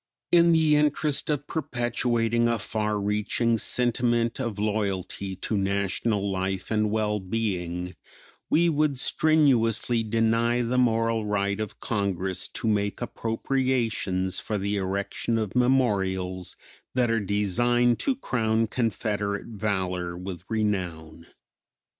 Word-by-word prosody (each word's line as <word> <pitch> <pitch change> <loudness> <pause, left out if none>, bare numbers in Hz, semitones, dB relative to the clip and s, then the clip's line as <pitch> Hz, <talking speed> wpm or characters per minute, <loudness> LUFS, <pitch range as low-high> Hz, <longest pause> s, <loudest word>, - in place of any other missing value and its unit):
In 170 -1 +6
the 160 -2 +4
interest 150 0 +1
of 145 -1 -1
perpetuating 120 -5 0
a 115 0 +1
far 105 0 -2
reaching 105 +3 0
sentiment 120 -1 +1
of 120 -6 -3
loyalty 100 -2 -2
to 100 +4 -3
national 100 +1 0
life 95 +1 -3
and 105 -1 +2
well 105 -1 0
being 90 -3 -3 0.5
we 170 +2 +4
would 150 -3 +1
strenuously 125 -6 +3
deny 115 +2 +1
the 125 +2 +1
moral 115 -2 +1
right 100 0 0
of 110 -2 -5
Congress 95 -4 -2
to - - -4
make 100 -1 0
appropriations 115 -6 -1
for 105 - -3
the 100 +1 -1
erection 100 +4 -1
of 110 -2 -3
memorials 95 -8 +1 0.4
that 125 -2 +2
are 115 - +2
designed 115 +5 +2
to 275 - +1
crown 115 - 0
Confederate 105 -2 -2
valor 95 -5 -2
with 90 -1 -6
renown. 90 -7 -2
110 Hz, 115 wpm, -26 LUFS, 100-120 Hz, 0.5 s, In